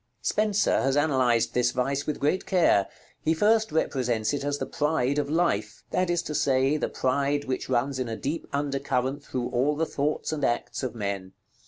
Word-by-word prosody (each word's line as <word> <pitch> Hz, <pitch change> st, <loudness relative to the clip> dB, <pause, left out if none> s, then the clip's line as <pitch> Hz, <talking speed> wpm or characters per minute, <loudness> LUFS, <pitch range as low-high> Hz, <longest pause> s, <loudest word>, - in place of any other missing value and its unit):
Spenser 215 Hz, -1 st, +2 dB
has 135 Hz, +1 st, +1 dB
analyzed 130 Hz, -6 st, +2 dB
this 125 Hz, 0 st, +2 dB
vice 135 Hz, +3 st, -1 dB
with 150 Hz, -, -2 dB
great 150 Hz, +7 st, 0 dB
care. 165 Hz, -, +3 dB, 0.3 s
He 160 Hz, +1 st, +1 dB
first 220 Hz, +3 st, +3 dB
represents 125 Hz, -7 st, 0 dB
it 145 Hz, -, -2 dB
as 145 Hz, 0 st, -1 dB
the -, -, -3 dB
Pride 150 Hz, -2 st, 0 dB
of 145 Hz, -1 st, -2 dB
life; 170 Hz, +3 st, 0 dB
that 185 Hz, -1 st, +1 dB
is 175 Hz, -1 st, +1 dB
to 150 Hz, -, -5 dB
say, 135 Hz, 0 st, +2 dB
the 155 Hz, -, -1 dB
pride 140 Hz, +2 st, 0 dB
which 130 Hz, 0 st, -3 dB
runs 130 Hz, +2 st, 0 dB
in 125 Hz, -2 st, -2 dB
a 110 Hz, -, -4 dB
deep 150 Hz, +5 st, -3 dB
under 140 Hz, -1 st, -1 dB
current 135 Hz, +1 st, -1 dB
through 125 Hz, -3 st, -3 dB
all 130 Hz, +4 st, +1 dB
the 160 Hz, +2 st, 0 dB
thoughts 150 Hz, +1 st, -2 dB
and 155 Hz, -2 st, -3 dB
acts 120 Hz, -, -1 dB
of 130 Hz, -3 st, -4 dB
men. 100 Hz, -3 st, -4 dB
140 Hz, 195 wpm, -26 LUFS, 125-155 Hz, 0.3 s, care